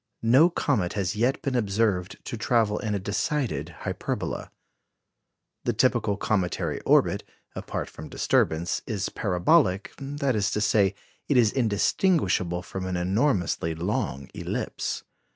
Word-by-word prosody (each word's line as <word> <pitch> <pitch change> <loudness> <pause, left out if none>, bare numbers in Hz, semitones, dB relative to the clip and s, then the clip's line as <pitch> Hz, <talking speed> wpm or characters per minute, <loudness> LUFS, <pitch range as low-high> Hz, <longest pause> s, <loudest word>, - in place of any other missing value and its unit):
No 130 +9 +6
comet 95 - 0
has 95 -2 -1
yet 125 +9 +1
been 135 -4 -1
observed 100 -4 0
to - - -4
travel 110 -2 +1
in 105 -3 -2
a - - -1
decided 100 - -1
hyperbola. - - -3 1.1
The - - 0
typical 100 -1 +2
cometary 95 -4 -1
orbit, - - +4 0.3
apart - - -4
from 80 - -10
disturbance, 85 +3 +1
is 105 -4 -2
parabolic 95 - +2
that 140 -2 -1
is 100 -1 +1
to - - +2
say, 105 -2 +3 0.3
it 140 - +4
is 115 -4 +5
indistinguishable 105 - +1
from 95 -1 -5
an 90 -1 -2
enormously 90 - +1
long 80 -6 -2
ellipse. - - -3
105 Hz, 130 wpm, -26 LUFS, 90-120 Hz, 1.1 s, No